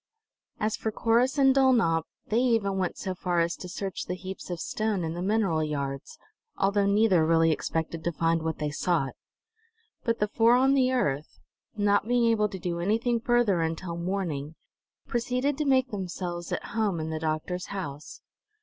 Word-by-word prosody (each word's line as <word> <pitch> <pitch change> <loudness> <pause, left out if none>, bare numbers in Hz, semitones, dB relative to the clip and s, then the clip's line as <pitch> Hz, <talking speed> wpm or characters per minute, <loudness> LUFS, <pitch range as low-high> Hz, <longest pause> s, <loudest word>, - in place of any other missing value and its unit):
As 215 0 0
for 220 - -3
Corrus 235 +5 +2
and 270 -1 +5
Dulnop, 235 -12 +3 0.2
they 220 - +1
even 225 -6 +1
went 185 -2 -2
so 190 - -3
far 180 -1 -1
as 170 0 +1
to 180 - -8
search 195 +2 -4
the 180 - -2
heaps 185 +1 -8
of 175 -2 -4
stone 215 0 -1
in 160 0 -2
the 175 - -5
mineral 190 -5 +1
yards, 140 -3 -4 0.4
although 200 +1 +2
neither 200 -4 +4
really 165 0 +4
expected 160 +1 -2
to 170 - 0
find 165 0 +1
what 160 0 -2
they 150 -1 -2
sought. 150 -3 0 0.9
But 230 -1 0
the 210 - +1
four 230 +3 +4
on 265 +2 +4
the 260 -2 +3
earth, 150 - -1 0.4
not 205 0 +2
being 245 0 +3
able 215 -2 +2
to 195 - -6
do 170 -1 -3
anything 230 +6 +1
further 235 -6 +2
until 165 +2 -3
morning, 170 -5 -3 0.5
proceeded 250 +4 -1
to 300 - 0
make 260 -2 +3
themselves 180 -3 -4
at - - -2
home 210 -6 0
in 160 0 -3
the 160 - -3
doctor's 160 +3 -2
house. 155 -7 -7
190 Hz, 175 wpm, -27 LUFS, 165-225 Hz, 0.9 s, and